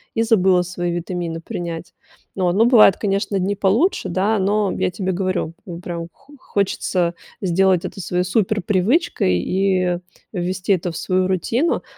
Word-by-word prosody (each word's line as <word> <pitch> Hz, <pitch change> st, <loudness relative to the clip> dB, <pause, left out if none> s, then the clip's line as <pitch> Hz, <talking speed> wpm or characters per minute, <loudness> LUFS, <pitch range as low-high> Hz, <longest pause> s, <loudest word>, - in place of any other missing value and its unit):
и 225 Hz, -, +2 dB
забыла 190 Hz, -5 st, +3 dB
свои 175 Hz, -1 st, -3 dB
витамины 170 Hz, -1 st, -3 dB
принять". 170 Hz, 0 st, -6 dB, 0.4 s
Вот. 180 Hz, -2 st, +1 dB
Ну, 215 Hz, +5 st, +4 dB
бывают, 230 Hz, -6 st, +6 dB
конечно, 200 Hz, 0 st, -1 dB
дни 195 Hz, +2 st, 0 dB
получше, 220 Hz, -, +1 dB
да, 200 Hz, +5 st, +1 dB
но 200 Hz, +1 st, +1 dB
я -, -, +1 dB
тебе 190 Hz, 0 st, -2 dB
говорю, 185 Hz, -3 st, -2 dB
ну, 170 Hz, -2 st, -7 dB
прям 170 Hz, -2 st, -5 dB
хо 280 Hz, +2 st, -21 dB
хочется 185 Hz, -5 st, -1 dB, 0.3 s
сделать 185 Hz, -1 st, +2 dB
это 195 Hz, -, -6 dB
своей 180 Hz, 0 st, -1 dB
суперпривычкой 200 Hz, -, +1 dB
и 185 Hz, -, +1 dB, 0.3 s
ввести 185 Hz, +1 st, 0 dB
это 180 Hz, -1 st, -1 dB
в 165 Hz, -, -7 dB
свою 185 Hz, 0 st, 0 dB
рутину. 225 Hz, -, 0 dB
185 Hz, 150 wpm, -20 LUFS, 175-205 Hz, 0.4 s, бывают